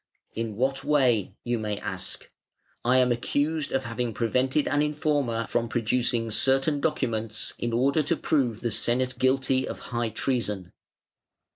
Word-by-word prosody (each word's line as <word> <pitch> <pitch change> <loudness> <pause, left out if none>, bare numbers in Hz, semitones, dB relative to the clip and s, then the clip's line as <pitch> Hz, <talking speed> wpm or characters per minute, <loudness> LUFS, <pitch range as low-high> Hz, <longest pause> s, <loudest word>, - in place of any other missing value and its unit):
'In 115 -2 -3
what 135 +4 0
way?' 125 -9 +2
you 120 -1 -1
may 105 -1 -2
ask. - - -6 0.5
I 125 +2 +4
am 125 -1 +4
accused 145 +6 0
of 135 0 0
having 115 -2 -3
prevented 130 +5 +1
an 145 +2 +2
informer 145 -6 0
from 115 +1 -1
producing 115 0 0
certain 135 +6 +2
documents 115 -7 -1
in 120 - -1
order 135 +6 +2
to 155 +3 0
prove 125 -8 0
the 120 - -1
Senate 125 +4 0
guilty 130 0 +2
of - - -5 0.2
high 120 -1 0
treason. 110 -6 -2
125 Hz, 145 wpm, -27 LUFS, 115-135 Hz, 0.5 s, I